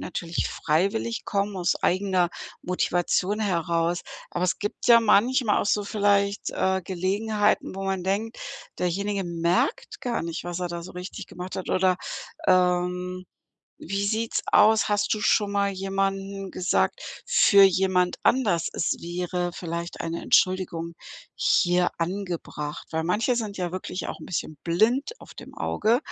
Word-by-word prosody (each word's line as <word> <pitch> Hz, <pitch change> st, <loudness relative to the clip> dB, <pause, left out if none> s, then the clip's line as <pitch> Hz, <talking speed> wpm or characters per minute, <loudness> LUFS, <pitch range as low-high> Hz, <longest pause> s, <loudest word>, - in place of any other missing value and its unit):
natürlich 170 Hz, -1 st, -3 dB
freiwillig 150 Hz, -, 0 dB
kommen, 200 Hz, 0 st, -1 dB
aus 180 Hz, -1 st, +1 dB
eigener 185 Hz, -1 st, +2 dB, 0.3 s
Motivation 180 Hz, +2 st, 0 dB
heraus, 170 Hz, -4 st, 0 dB, 0.3 s
aber 175 Hz, -, -1 dB
es 185 Hz, -, 0 dB
gibt 205 Hz, +2 st, -3 dB
ja 235 Hz, -1 st, +9 dB
manchmal 225 Hz, +1 st, +3 dB
auch -, -, -2 dB
so 205 Hz, 0 st, +1 dB
vielleicht, 200 Hz, -1 st, +1 dB
äh, 190 Hz, 0 st, 0 dB
Gelegenheiten, 205 Hz, +4 st, 0 dB
wo 195 Hz, -, -4 dB
man 190 Hz, -1 st, -1 dB
denkt: 205 Hz, +5 st, -2 dB, 0.4 s
„Derjenige 200 Hz, +3 st, -1 dB
merkt 170 Hz, -, -1 dB
gar 245 Hz, -2 st, -2 dB
nicht, 165 Hz, 0 st, -4 dB
was 175 Hz, 0 st, -4 dB
er 180 Hz, -1 st, -2 dB
da 170 Hz, 0 st, -5 dB
so 180 Hz, -, -9 dB
richtig 180 Hz, +2 st, -7 dB
gemacht 180 Hz, +1 st, -7 dB
hat“, 190 Hz, -, -4 dB
oder, 185 Hz, -1 st, +3 dB, 0.5 s
ähm, 180 Hz, 0 st, +1 dB, 0.6 s
wie 195 Hz, +3 st, -1 dB
sieht's 225 Hz, +2 st, 0 dB
aus? 220 Hz, +1 st, +5 dB
Hast 205 Hz, 0 st, +1 dB
du 215 Hz, -, 0 dB
schon 205 Hz, -1 st, +2 dB
mal 200 Hz, 0 st, +1 dB
jemanden 195 Hz, 0 st, -2 dB
gesagt 180 Hz, -, +1 dB, 0.3 s
für 200 Hz, -, +6 dB
jemand 185 Hz, -1 st, +2 dB
anders: 205 Hz, -10 st, +2 dB
„Es -, -, 0 dB
wäre 175 Hz, +1 st, -2 dB
vielleicht 170 Hz, 0 st, -5 dB
eine 165 Hz, +1 st, -3 dB
Entschuldigung 170 Hz, -3 st, +1 dB, 0.4 s
hier 180 Hz, -, +3 dB
angebracht.“ 170 Hz, -4 st, -4 dB
Weil 160 Hz, 0 st, 0 dB
manche 210 Hz, +9 st, +1 dB
sind 215 Hz, -4 st, -3 dB
ja 180 Hz, -2 st, -3 dB
wirklich 185 Hz, 0 st, -4 dB
auch -, -, -6 dB
'n -, -, -9 dB
bisschen 155 Hz, -3 st, -3 dB
blind 220 Hz, -, +2 dB
auf -, -, -14 dB
dem -, -, -11 dB
Auge 225 Hz, +3 st, +1 dB
185 Hz, 145 wpm, -25 LUFS, 175-205 Hz, 0.6 s, ja